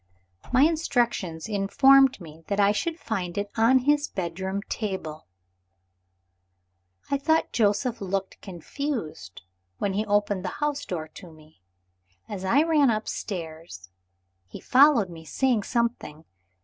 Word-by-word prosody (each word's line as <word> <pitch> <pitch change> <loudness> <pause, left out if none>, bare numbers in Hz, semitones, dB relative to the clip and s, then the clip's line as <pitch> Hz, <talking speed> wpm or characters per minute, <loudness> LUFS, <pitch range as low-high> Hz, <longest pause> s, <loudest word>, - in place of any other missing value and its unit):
My 255 +2 +5
instructions 240 - 0
informed 265 +6 +4
me 160 -2 -13
that 200 0 -2
I 200 0 +5
should 330 +10 -2
find 185 -6 -4
it 205 0 -3
on 230 +4 +4
his 290 +3 +2
bedroom 190 +2 -4
table. 190 -10 -5 1.8
I 280 - +1
thought 320 +3 +1
Joseph 230 +2 +1
looked 195 0 -4
confused 195 - -6 0.3
when 200 - -1
he 205 +2 0
opened 205 -2 +1
the 185 - -5
house 295 -1 -2
door 160 -4 -4
to 175 +2 -13
me. 155 -6 -20 0.7
As 195 -3 -6
I 275 +11 +3
ran 305 -5 +3
upstairs, 165 - -5 0.6
he 85 - -10
followed 255 -8 +4
me, 165 -1 -10
saying 245 - 0
something. 230 - -3
205 Hz, 125 wpm, -25 LUFS, 175-260 Hz, 1.8 s, My